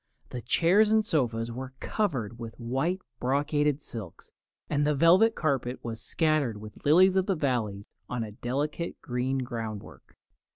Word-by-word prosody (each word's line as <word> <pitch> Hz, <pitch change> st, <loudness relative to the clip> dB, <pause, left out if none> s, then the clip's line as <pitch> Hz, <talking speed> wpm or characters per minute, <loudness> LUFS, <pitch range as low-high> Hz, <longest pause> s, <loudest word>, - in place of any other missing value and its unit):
The 125 Hz, -, -5 dB
chairs 190 Hz, -, +4 dB
and 220 Hz, -1 st, +4 dB
sofas 120 Hz, -, 0 dB
were 130 Hz, +2 st, -6 dB
covered 125 Hz, -, -2 dB
with 115 Hz, 0 st, -8 dB
white 135 Hz, +11 st, -1 dB, 0.2 s
brocaded 145 Hz, +2 st, +1 dB
silks, 105 Hz, -8 st, -8 dB, 0.4 s
and 145 Hz, 0 st, +1 dB
the 150 Hz, 0 st, +2 dB
velvet 185 Hz, +10 st, +5 dB
carpet 135 Hz, -5 st, -1 dB
was 115 Hz, -1 st, -5 dB
scattered 155 Hz, -9 st, +1 dB
with 105 Hz, 0 st, -11 dB
lilies 185 Hz, +6 st, +5 dB
of 190 Hz, -1 st, +2 dB
the 195 Hz, -, +2 dB
valley 120 Hz, -, -1 dB, 0.3 s
on 120 Hz, -2 st, -2 dB
a 110 Hz, -, -7 dB
delicate 145 Hz, +9 st, -3 dB
green 125 Hz, +2 st, -1 dB
groundwork. 115 Hz, -4 st, -7 dB
135 Hz, 150 wpm, -28 LUFS, 115-160 Hz, 0.4 s, velvet